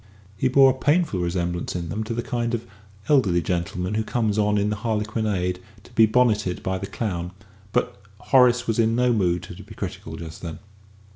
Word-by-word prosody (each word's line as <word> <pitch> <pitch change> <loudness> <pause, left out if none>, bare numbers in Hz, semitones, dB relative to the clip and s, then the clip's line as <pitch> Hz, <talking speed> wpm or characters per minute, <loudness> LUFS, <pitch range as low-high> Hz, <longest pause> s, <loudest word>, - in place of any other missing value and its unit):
He 130 - +1
bore 135 +1 +6
a - - -2
painful 150 - +1
resemblance 85 0 -2
in 85 -2 -4
them 105 +7 -2
to 115 - -3
the 120 - -2
kind 120 -1 -1
of 115 - -6 0.4
elderly 100 - +3
gentleman 90 +3 -2
who 110 +1 0
comes 110 -2 0
on 105 0 +2
in 105 +1 +1
the 105 - -2
harlequinade 105 -4 -1 0.2
to 120 - -18
be 115 -1 +6
bonneted 110 -5 +1
by 95 0 -1
the 100 - -5
clown; 90 -7 -3 0.4
but 100 - -1 0.2
Horace 125 -1 +4
was 115 0 -1
in 115 0 +3
no 125 0 +3
mood 90 -5 +1
to - - -9
be - - -13
critical 80 - -6
just 80 -1 -9
then. 85 -3 -6
105 Hz, 195 wpm, -24 LUFS, 90-120 Hz, 0.4 s, bore